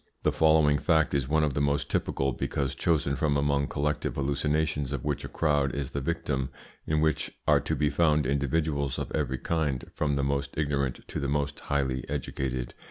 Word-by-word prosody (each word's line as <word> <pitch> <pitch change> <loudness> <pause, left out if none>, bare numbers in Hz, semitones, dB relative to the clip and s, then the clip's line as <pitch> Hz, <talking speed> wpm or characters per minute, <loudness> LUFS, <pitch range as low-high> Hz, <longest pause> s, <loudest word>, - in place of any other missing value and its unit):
The - - +3
following 80 -2 +4
fact 80 -1 +2
is 70 -2 +1
one 80 +2 +2
of 75 -3 +1
the 70 - 0
most 70 0 0
typical, 70 0 0
because 65 +2 -2
chosen 75 -4 +1
from 70 +1 +1
among 70 0 +1
collective 75 +1 -1
hallucinations 75 +1 0
of 70 -4 -3
which 75 -3 -1
a - - -4
crowd 75 -4 +1
is 70 -2 -3
the 70 - -2
victim, 70 -3 -1 0.4
in 75 0 +2
which 80 0 +1 0.2
are - - +6
to - - -2
be 75 -2 +1
found 75 -1 +3
individuals 70 0 0
of - - -4
every 65 -4 -1
kind, 75 -4 -1
from 75 -2 0
the 70 - 0
most 70 0 -1
ignorant 70 -4 -1
to - - -3
the 70 - -2
most 70 0 -1
highly 65 -3 -1
educated. 65 -3 -3
70 Hz, 190 wpm, -28 LUFS, 70-75 Hz, 0.4 s, are